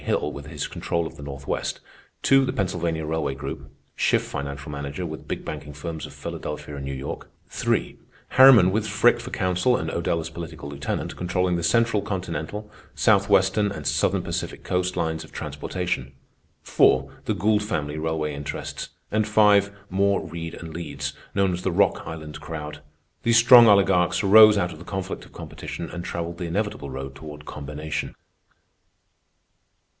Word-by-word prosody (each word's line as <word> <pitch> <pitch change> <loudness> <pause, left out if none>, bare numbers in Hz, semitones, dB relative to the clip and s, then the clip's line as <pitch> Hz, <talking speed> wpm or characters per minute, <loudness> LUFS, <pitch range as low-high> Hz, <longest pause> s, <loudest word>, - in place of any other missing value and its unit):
Hill 75 - 0
with 70 0 -9
his 75 -2 -4
control 85 -1 -2
of - - -7
the - - -11
Northwest; 70 -1 -4 0.4
(2) 135 0 +5
the 130 - 0
Pennsylvania 85 -4 -1
railway 80 -3 -1
group, 65 - -7 0.2
Schiff - - +2
financial 70 +1 -5
manager, 70 +4 -4
with 80 -2 -7
big - - -4
banking 75 -1 -6
firms 80 +2 -6
of - - -12
Philadelphia 75 - -6
and 70 - -6
New 70 - -4
York; 65 +1 -6 0.2
(3) - - -1 0.3
Harriman, 130 -9 +8
with 110 +2 0
Frick 110 +4 +4
for 120 +2 -7
counsel 95 +6 +1
and 80 +1 -3
Odell 85 0 0
as 80 - -5
political 80 -3 -7
lieutenant, 70 0 -4
controlling 90 0 0
the 85 - -1
central 115 +4 +3
continental, 95 +2 -4 0.3
Southwestern 95 +2 +3
and 100 - -7
Southern - - +1
Pacific - - -4
Coast 90 0 -1
lines 80 -1 -1
of - - -15
transportation; 65 +2 -4 0.5
(4) - - +3
the - - 0
Gould 105 +2 +2
family 75 -8 -3
railway 80 -1 -1
interests; 70 0 -5 0.2
and 110 0 +1
(5) 105 -2 +5 0.2
Moore, 100 +1 +2
Reid, 80 -1 -6
and 80 -2 -9
Leeds, 70 -4 -4 0.2
known 95 -2 +2
as 90 - -3
the 95 - 0
"Rock 95 +2 +2
Island 75 -2 -7
crowd." 75 -2 -6 0.4
These 115 0 +4
strong 120 0 +9
oligarchs 95 -2 +4
arose 105 +1 +8
out 90 -3 0
of 80 - -12
the - - -10
conflict 95 +1 -5
of - - -18
competition - - -7
and 85 0 -5
travelled 85 0 -4
the 90 - -3
inevitable 100 -4 -2
road 65 +1 -6
toward 75 +1 -10
combination. 75 +2 -5
85 Hz, 165 wpm, -24 LUFS, 75-100 Hz, 0.5 s, strong